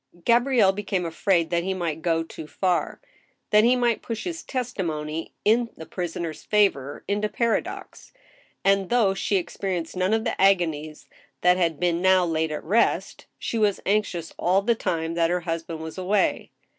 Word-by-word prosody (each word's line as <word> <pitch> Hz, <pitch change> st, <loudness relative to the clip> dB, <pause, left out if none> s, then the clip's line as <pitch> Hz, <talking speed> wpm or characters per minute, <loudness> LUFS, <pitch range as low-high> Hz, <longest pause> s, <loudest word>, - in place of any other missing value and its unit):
» 175 Hz, -, -24 dB
Gabrielle 235 Hz, -4 st, +4 dB
became 195 Hz, -2 st, -2 dB
afraid 170 Hz, 0 st, +1 dB
that 170 Hz, 0 st, +1 dB
he 190 Hz, +1 st, -2 dB
might 165 Hz, -3 st, -3 dB
go 165 Hz, -1 st, +1 dB
too 160 Hz, -1 st, -9 dB
far; 180 Hz, +2 st, -1 dB, 0.5 s
that 210 Hz, 0 st, +6 dB
he 245 Hz, +2 st, +5 dB
might 240 Hz, -2 st, +1 dB
push 230 Hz, -2 st, -5 dB
his 340 Hz, -2 st, -4 dB
testimony 165 Hz, -, -4 dB
in 230 Hz, +3 st, +3 dB
the 160 Hz, -, -8 dB
prisoner's 170 Hz, -2 st, -5 dB
favor 190 Hz, -10 st, +1 dB
into 205 Hz, +1 st, 0 dB
paradox, 230 Hz, +2 st, -2 dB, 0.5 s
and, 195 Hz, -1 st, +3 dB
though 230 Hz, -5 st, +3 dB
she 195 Hz, +1 st, -1 dB
experienced 180 Hz, -2 st, -3 dB
none 185 Hz, +2 st, +1 dB
of 220 Hz, 0 st, +2 dB
the -, -, -2 dB
agonies 160 Hz, -6 st, +1 dB, 0.3 s
that 180 Hz, 0 st, +4 dB
had 165 Hz, -4 st, 0 dB
been 175 Hz, -1 st, +1 dB
now 185 Hz, -1 st, +4 dB
laid 160 Hz, -1 st, -1 dB
at 150 Hz, -, -4 dB
rest, 210 Hz, +8 st, 0 dB
she 230 Hz, -, -3 dB
was 205 Hz, -2 st, +2 dB
anxious 195 Hz, -5 st, -1 dB
all 190 Hz, +3 st, +2 dB
the 235 Hz, +3 st, +3 dB
time 165 Hz, -6 st, -2 dB
that 165 Hz, -1 st, +2 dB
her 180 Hz, 0 st, 0 dB
husband 165 Hz, -1 st, -4 dB
was 160 Hz, +3 st, -7 dB
away. 195 Hz, +2 st, 0 dB
185 Hz, 170 wpm, -25 LUFS, 165-210 Hz, 0.5 s, that